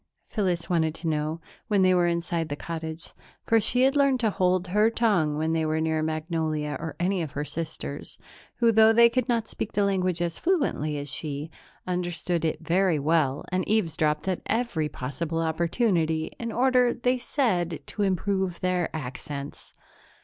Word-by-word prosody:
Phyllis 185 -6 -1
wanted 160 -3 +1
to 165 - -5
know, 155 +1 -1 0.3
when 205 -3 +3
they 185 0 +5
were 175 -1 +3
inside 170 -1 -1
the 145 - -2
cottage, 160 +1 -6 0.3
for 225 -1 +4
she 250 +5 +3
had 270 +2 +3
learned 275 -2 +3
to 220 -3 +2
hold 185 -1 +1
her 210 +4 +4
tongue 200 -11 +1
when 160 +1 0
they 160 -1 +1
were 155 0 0
near 160 0 0
Magnolia 155 -1 -2
or 160 0 -5
any 185 +1 +1
of 155 -4 -5
her 145 +1 -3
sisters, 155 -3 -6 0.4
who, 235 -1 +3
though 220 0 +6
they 235 +1 +7
could 255 +1 -1
not 230 -2 +1
speak 215 - -5
the 205 - +2
language 185 -3 0
as 170 -1 -2
fluently 275 - 0
as 145 -1 -4
she, 150 +1 -4 0.3
understood 175 -1 -2
it 160 0 -1
very 175 +1 +2
well 145 -2 +1
and 185 0 +1
eavesdropped 160 -7 +1
at 185 -2 -1
every 215 -10 0
possible 150 +6 -4
opportunity 165 0 0
in 230 -1 -3
order, 250 0 +3
they 250 +1 +1
said, 180 - 0
to 210 - -5
improve 190 -1 0
their 180 -2 0
accents. 140 0 -7
170 Hz, 170 wpm, -26 LUFS, 160-210 Hz, 0.4 s, they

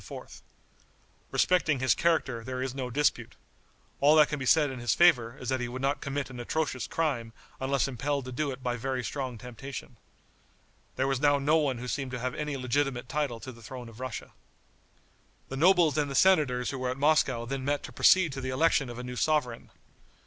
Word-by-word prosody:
Respecting 170 -5 +2
his 130 -1 +3
character 140 -8 0
there 130 +1 -5
is 130 -1 -3
no 130 -2 -4
dispute. 145 +4 0 0.6
All 145 +2 +5
that 155 -1 +6
can 150 - -3
be 130 - -4
said 150 -2 +4
in 130 - -7
his 120 0 +1
favor 135 -9 +4
is 125 - -6
that 130 -1 0
he 125 - -2
would 130 +2 -6
not 140 +1 0
commit 140 -1 -3
an 125 - -8
atrocious 130 +1 -2
crime 125 -9 -2 0.3
unless 135 0 0
impelled 135 0 -3
to 145 +1 -1
it 130 0 -9
by 125 -1 -1
very 130 +1 -2
strong 130 -2 -4
temptation. 125 +1 -9 1.0
There 130 - 0
was 135 -2 0
now 145 0 +4
no 145 +3 +3
one 140 -5 0
who 125 +1 -6
seemed 135 +1 -3
to 125 -1 -5
have 125 +1 -2
any 150 -2 -3
legitimate 130 -1 -1
title 140 -6 -2
to 130 - -7
the 115 -1 -15
throne 120 +1 -8
of 115 0 -14
Russia. 130 -3 -6 1.2
The 135 - -5
nobles 170 -1 +4
and 145 -1 0
the 135 - -4
senators 140 -9 +3
who 135 - -5
were 130 0 -1
at 130 - -3
Moscow 140 -5 +2
then 135 +2 -4
met 145 +1 -1
to - - -8
proceed 185 -6 +4
to 135 - -5
the 130 - -4
election 135 0 +2
of 120 - -8
a 125 - -6
new 125 0 -6
sovereign. 125 -4 0
135 Hz, 205 wpm, -28 LUFS, 125-145 Hz, 1.2 s, that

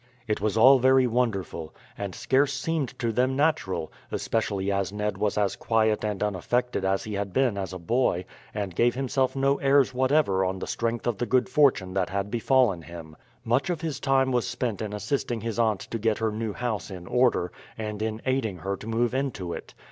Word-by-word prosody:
It 105 -2 -1
was 110 0 0
all 130 +4 +8
very 130 +1 +5
wonderful, 110 -9 -1 0.2
and 100 -3 -5
scarce 135 +1 +2
seemed 145 -1 -2
to 115 -1 -1
them 130 +3 +1
natural, 145 - 0 0.2
especially 100 -3 -1
as 100 -1 -1
Ned 105 -1 -3
was 105 0 0
as 100 -2 +1
quiet 110 -1 +1
and 105 -2 -1
unaffected 105 +3 -1
as 95 0 +1
he 110 - -6
had 100 -1 -3
been 130 -5 +2
as 95 -1 -4
a 95 - -5
boy, 90 -1 0 0.3
and 100 -3 -4
gave 120 +7 +2
himself 135 0 0
no 135 +1 +2
airs 135 -1 +3
whatever 130 -7 +2
on 95 +1 -1
the 95 - -5
strength 115 0 -2
of 120 -4 -1
the 120 - -1
good 130 +2 +2
fortune 130 -10 +3
that 95 -2 0
had 100 +1 -2
befallen 120 -6 +2
him. 80 -2 -10 0.3
Much 125 +10 +1
of 170 -3 -2
his 160 -5 -3
time 135 -1 +2
was 120 -2 +1
spent 115 -6 -2
in 110 -2 -3
assisting 110 +2 -2
his 115 0 -3
aunt 110 -5 +2
to 115 - -5
get 110 0 +1
her 110 -1 0
new 110 0 -3
house 110 -7 -3
in 90 -3 -8
order, 125 -7 +2 0.3
and 105 -1 -4
in 110 0 -3
aiding 130 -7 0
her 95 +4 -3
to 110 - -10
move 115 +2 0
into 125 -10 -2
it. - - -9
110 Hz, 205 wpm, -26 LUFS, 100-130 Hz, 0.3 s, all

